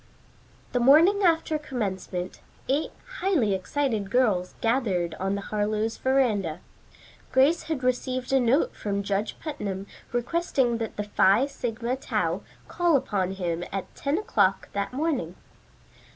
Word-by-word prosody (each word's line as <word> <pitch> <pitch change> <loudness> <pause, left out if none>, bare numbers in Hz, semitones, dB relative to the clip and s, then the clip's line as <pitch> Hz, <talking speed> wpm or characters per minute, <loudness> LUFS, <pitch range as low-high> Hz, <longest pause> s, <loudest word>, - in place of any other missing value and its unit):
The 245 - +1
morning 320 +11 +6
after 325 -4 +2
commencement, 190 -9 -4 0.3
eight 280 +4 +1 0.3
highly 300 - +2
excited 215 +1 -1
girls 210 -7 +1
gathered 205 -9 0
on 195 +1 0
the 200 - -3
Harlowe's 215 +2 -1
veranda. 215 -11 +1 0.7
Grace 280 +6 +4
had 295 -5 -2
received 255 +1 -1
a 270 - +5
note 260 - +2
from 200 -1 -2
Judge 200 +1 -2
Putnam 205 - -4 0.3
requesting 245 -1 0
that 225 -1 -4
the 210 - -1
Phi 205 +3 +4
Sigma 240 -2 -3
Tau 270 - -1 0.3
call 345 -3 +2
upon 190 -7 -1
him 175 -3 -2
at 195 -1 -5
ten 285 +3 -1
o'clock 200 - +1
that 200 0 -2
morning. 260 - -1
235 Hz, 130 wpm, -26 LUFS, 195-275 Hz, 0.7 s, morning